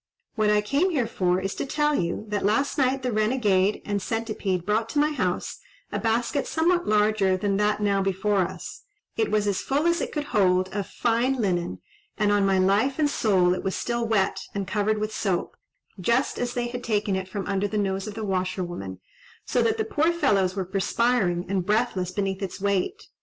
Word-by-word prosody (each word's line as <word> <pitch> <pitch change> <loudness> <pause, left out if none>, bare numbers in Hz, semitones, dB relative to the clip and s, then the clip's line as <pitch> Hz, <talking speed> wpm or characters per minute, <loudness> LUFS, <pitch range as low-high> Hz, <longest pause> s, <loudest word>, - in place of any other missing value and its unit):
What 215 -2 +1
I 210 0 +4
came 280 - +1
here 280 -9 0
for 185 -5 0
is 195 +1 -3
to - - -3
tell 295 +2 +1
you, 175 -2 -1
that 210 -1 -1
last 220 +8 +1
night 265 -2 +1
the 250 - 0
Renegade 215 -3 +1
and 205 -1 -1
Centipede 215 -5 -2
brought 220 +3 0
to 290 - -4
my 300 +1 +3
house 185 -12 -2 0.3
a - - -2
basket 235 +4 0
somewhat 350 +2 +1
larger 210 -3 +3
than 195 +1 0
that 210 0 +1
now 200 -1 +2
before 195 +1 0
us; 185 0 -5 0.3
it 445 - 0
was 210 -1 +1
as 200 -2 0
full 285 +4 0
as 340 0 +2
it - - -3
could 300 - -2
hold 185 -8 +2
of 200 0 -3
fine 235 +3 +1
linen, 175 - -1 0.4
and, 210 -1 +2
on 205 -1 +3
my 195 -1 +3
life 200 +8 +2
and 300 -2 +2
soul, 185 -7 +3
it 185 - -4
was 190 - -1
still 235 -1 -2
wet 205 -4 +1 0.2
and 200 -2 -2
covered 215 +1 0
with 215 0 -3
soap, 190 -5 -1 0.4
just 235 +8 +1
as 245 0 -2
they 240 -1 0
had 245 0 -6
taken 205 -3 0
it 190 0 -3
from 195 -1 -4
under 200 0 0
the 215 - -3
nose 195 0 -1
of 210 - -6
the 220 -1 -4
washerwoman, 180 - -3 0.5
so - - +1
that 445 -1 +1
the 435 - 0
poor 330 -5 +2
fellows 200 - +1
were 190 -2 -2
perspiring 195 -1 +1
and 190 -1 -1
breathless 210 -4 +1
beneath 195 0 -2
its 190 -1 -5
weight. 200 - -1
210 Hz, 205 wpm, -25 LUFS, 190-240 Hz, 0.5 s, I